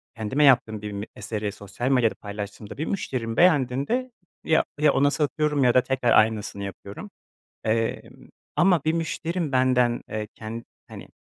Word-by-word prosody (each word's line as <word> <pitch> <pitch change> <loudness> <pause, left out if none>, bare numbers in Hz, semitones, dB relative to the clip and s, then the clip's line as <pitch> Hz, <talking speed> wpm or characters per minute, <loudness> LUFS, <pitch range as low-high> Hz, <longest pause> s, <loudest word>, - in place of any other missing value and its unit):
kendime 115 +7 0
yaptığım 120 -6 +4
bir 105 - -5
m 100 +1 -5
eseri 105 -2 -4
sosyal 105 +5 -5
medyada 125 -4 +3
paylaştığımda 100 0 -7
bir 155 - -2
müşterim 125 - -3
beğendiğinde 165 - +2 0.3
ya 160 - +3 0.2
ya 150 -1 +4
ona 145 +1 +3
satıyorum 150 -1 0
ya 125 -1 +4
da 125 - +5
tekrar 130 -2 0
aynısını 110 -2 +2
yapıyorum. 100 +1 -8 0.6
Emm, 115 +3 -2 0.3
ama 175 -3 +4
bir 160 - +2
müşterim 165 -1 -2
benden, 125 -2 +2
eee, 105 -1 -4
ken 115 +1 -7 0.2
hani, - - -10
125 Hz, 150 wpm, -25 LUFS, 110-150 Hz, 0.6 s, da